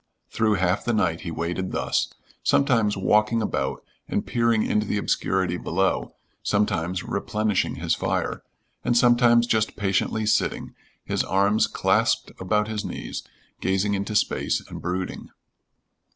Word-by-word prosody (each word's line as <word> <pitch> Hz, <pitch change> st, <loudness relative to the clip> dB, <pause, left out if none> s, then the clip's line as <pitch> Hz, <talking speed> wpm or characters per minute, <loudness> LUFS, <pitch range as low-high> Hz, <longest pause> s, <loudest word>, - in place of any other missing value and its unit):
Through 110 Hz, -2 st, +2 dB
half 90 Hz, 0 st, +1 dB
the 120 Hz, -, 0 dB
night 90 Hz, -6 st, +1 dB
he 90 Hz, -, -5 dB
waited 85 Hz, +3 st, -3 dB
thus, -, -, 0 dB, 0.3 s
sometimes 115 Hz, -7 st, +2 dB
walking 105 Hz, +4 st, +3 dB
about 70 Hz, -11 st, -2 dB, 0.2 s
and -, -, -1 dB
peering 115 Hz, -2 st, +2 dB
into 105 Hz, 0 st, 0 dB
the 105 Hz, -, 0 dB
obscurity 95 Hz, -3 st, 0 dB
below, 95 Hz, +3 st, -1 dB, 0.3 s
sometimes 95 Hz, -4 st, 0 dB
replenishing 105 Hz, -1 st, -1 dB
his -, -, 0 dB
fire, -, -, -1 dB, 0.4 s
and 120 Hz, -, +2 dB
sometimes 120 Hz, -1 st, +5 dB
just 110 Hz, -2 st, 0 dB
patiently 100 Hz, +2 st, 0 dB
sitting, 105 Hz, -, 0 dB, 0.3 s
his -, -, 0 dB
arms 100 Hz, +3 st, +2 dB
clasped -, -, +1 dB
about 105 Hz, +3 st, +1 dB
his 110 Hz, -1 st, -3 dB
knees, -, -, -5 dB, 0.4 s
gazing 95 Hz, +2 st, +1 dB
into 100 Hz, +2 st, -2 dB
space 105 Hz, -, +1 dB
and -, -, -7 dB
brooding. 90 Hz, +1 st, -4 dB
105 Hz, 135 wpm, -24 LUFS, 95-110 Hz, 0.4 s, sometimes